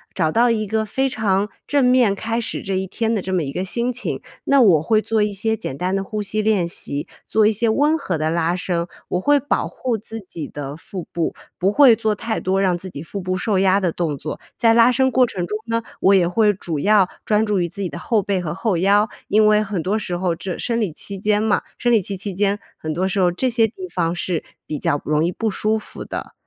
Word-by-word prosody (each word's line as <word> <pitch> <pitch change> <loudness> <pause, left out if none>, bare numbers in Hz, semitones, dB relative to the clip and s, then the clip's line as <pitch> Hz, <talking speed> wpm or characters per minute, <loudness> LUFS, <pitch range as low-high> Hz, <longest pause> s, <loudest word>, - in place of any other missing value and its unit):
找 160 -4 +1
到 240 +5 +4
一 220 -2 0
个 220 +1 -1
非 265 +6 0
常 205 -3 0 0.2
正 285 -1 +2
面 250 -5 +4
开 225 +3 -2
始 235 - -4
这 195 -1 -2
一 190 0 -2
天 225 +4 -1
的 215 - 0
这 190 +1 -4
么 180 -3 +1
一 135 - -4
个 180 +6 -3
心 235 +6 -1
情。 250 0 -4 0.2
那 275 -1 +5
我 180 -10 +5
会 215 +7 +2
做 220 0 0
一 210 0 0
些 220 +3 0
简 135 -11 -5
单 180 +3 -1
的 195 - +1
呼 210 +2 -4
吸 210 +1 -1
练 210 -4 +2
习， 145 -3 -2 0.2
做 220 -1 +3
一 215 - +5
些 225 +2 +1
温 290 +8 +3
和 180 - -2
的 155 +1 0
拉 170 +1 +1
伸， 175 -2 -2 0.2
我 180 - 0
会 290 +9 +4
保 285 +1 -1
护 245 -3 -2
自 225 +1 -8
己 170 -5 -7
的 145 0 -7
腹 180 +1 -7
部， 170 -2 -2 0.2
不 190 +3 +2
会 275 -2 +7
做 220 -1 0
太 225 +1 -3
多 190 +1 0
让 185 -3 +2
自 185 +2 -7
己 145 -4 -8
腹 200 +4 -6
部 185 0 -2
受 200 0 0
压 195 +1 +3
的 180 -3 +1
动 160 -4 -2
作。 155 - -6 0.2
在 230 -1 +4
拉 230 +1 +6
伸 260 0 +2
过 255 0 +4
程 185 -6 -3
中 210 +5 -3
呢， 230 0 -1 0.2
我 195 +1 +5
也 185 -2 +4
会 210 +4 +3
主 170 -5 -4
要 200 +2 +4 0.2
专 215 0 +2
注 210 -3 +1
于 175 - 0
自 200 - -8
己 185 - -2
的 145 - -7
后 220 -4 +1
背 195 0 0
和 160 -4 -3
后 195 0 0
腰。 200 +4 +3 0.2
因 215 +1 +4
为 210 0 +5
很 195 -5 -3
多 205 +5 0
时 180 -4 -3
候 175 -1 0
这 180 +2 -5
生 235 -1 -1
理 205 -8 -1
期 200 +5 -5
间 210 +1 +1
嘛 220 -2 +1
生 240 - +1
理 225 -3 +4
期 195 +2 -4
期 195 +1 -4
间， 200 +2 +1 0.2
很 155 0 -4
多 180 +4 0
时 195 +1 -1
候 180 -2 +4
这 255 +9 0
些 230 -2 +3
地 370 - -8
方 170 -2 0
是 175 -1 -2 0.2
比 150 - -3
较 145 0 0
容 150 +1 +1
易 175 - 0
不 220 +4 -2
舒 215 +2 0
服 - - -9
的， - - -6
200 Hz, 275 characters per minute, -21 LUFS, 180-220 Hz, 0.2 s, 会